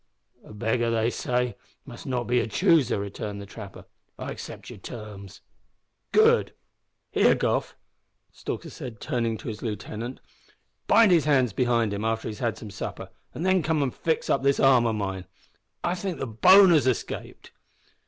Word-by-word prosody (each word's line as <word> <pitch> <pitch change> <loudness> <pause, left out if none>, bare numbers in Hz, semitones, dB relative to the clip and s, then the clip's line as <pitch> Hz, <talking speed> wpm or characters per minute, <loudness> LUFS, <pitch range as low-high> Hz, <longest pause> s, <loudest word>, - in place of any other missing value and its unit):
"A - - -14
beggar, 115 +2 0
they 115 +1 +1
say, 125 0 -1 0.3
must 120 -1 -10
not 125 -2 -1
be 125 +1 +1
a - - -1
chooser," 125 +4 +3
returned 100 +1 -5
the 100 - -8
trapper. 100 -1 -10 0.3
"I - - -5
accept - - -9
your - - -11
terms." 105 -3 -9 0.7
"Good. 450 +2 +4 0.6
Here, - - +4
Goff," - - -1 0.6
said - - -21 0.3
Stalker, 135 -6 -7
turning 115 -5 -1
to - - -10
his 110 -2 -5
lieutenant, 110 +3 -5 0.7
"bind 225 -4 +6
his 165 -5 +4
hands 130 -7 +3
behind 120 -3 +1
him 100 +1 -3
after 110 0 -1
he's 105 -2 -6
had 115 -3 -1
some 105 - -9
supper, - - -6 0.2
and 170 - -3
then 185 -1 +3
come 155 -2 +1
an' 130 - -1
fix 160 +5 -1
up 135 - +2
this 140 0 +2
arm 130 -3 +5
o' 115 - 0
mine. 95 -3 -3 0.6
I 175 - +1
think 180 -1 -4
the - - -3
bone 185 - +7
has 150 -5 +4
escaped." 130 - -3
120 Hz, 170 wpm, -26 LUFS, 110-145 Hz, 0.7 s, bone